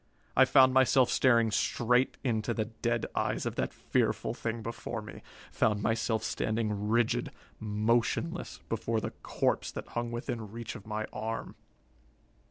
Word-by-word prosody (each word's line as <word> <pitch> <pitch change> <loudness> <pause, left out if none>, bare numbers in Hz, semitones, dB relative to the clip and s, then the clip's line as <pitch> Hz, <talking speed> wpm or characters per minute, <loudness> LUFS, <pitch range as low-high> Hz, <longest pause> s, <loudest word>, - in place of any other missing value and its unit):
I 130 - +7
found 130 -1 +6
myself 130 -1 +5
staring 115 -4 +4
straight 125 +4 +2
into 115 -2 0
the 110 - 0
dead 120 +1 -2
eyes - - -1
of - - -1
that - - 0
fearful - - 0
thing 115 -1 -4
before 115 0 -4
me, 105 - -10 0.3
found 105 -1 +1
myself 110 0 0
standing 105 -2 -1
rigid, 115 0 +2 0.3
motionless, 115 - 0
before 115 0 -1
the - - -4
corpse - - 0
that - - -7
hung 120 0 -3
within 120 -2 -4
reach 115 0 -6
of 105 -2 -11
my 110 0 -2
arm. 115 +1 -4
115 Hz, 145 wpm, -30 LUFS, 110-120 Hz, 0.3 s, I